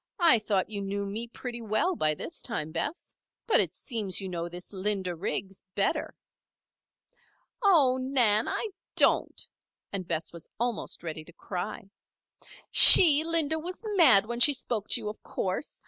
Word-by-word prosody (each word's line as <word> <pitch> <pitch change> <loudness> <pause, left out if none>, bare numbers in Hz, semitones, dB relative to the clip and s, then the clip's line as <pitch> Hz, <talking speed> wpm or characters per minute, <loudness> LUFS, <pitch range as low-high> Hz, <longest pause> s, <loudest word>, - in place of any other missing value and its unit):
"I 335 - +4
thought 205 -3 -2
you 205 -1 -4
knew 200 +1 -4
me 215 +4 -5
pretty 240 0 -8
well 225 - -1
by 155 - 0
this 330 - -7
time, 160 -10 -5
Bess. 175 - -5 0.3
But, 450 - +3
it 185 -3 -1
seems 215 -7 -1
you 195 - -6
know 170 -1 -5
this 180 +3 -9
Linda 190 -2 -2
Riggs 190 +2 -5
better." 200 - -2 1.5
"Oh, 295 - +3
Nan! 240 -5 +2
I 445 - -3 0.3
don't," - - +1 0.5
and 185 -3 -4
Bess 160 - -4
was 170 -1 -11
almost 240 -6 -4
ready 160 -2 -6
to 170 - -17
cry. 195 +3 -7 0.8
"She, 310 -4 +9
Linda, 320 -1 +1
was 360 +6 -9
mad 250 - +6
when 235 +2 -5
she 290 +4 +6
spoke 225 -5 -5
to - - +1
you, - - -7
of 210 - -8
course. 190 +10 -5
215 Hz, 160 wpm, -27 LUFS, 190-270 Hz, 1.5 s, She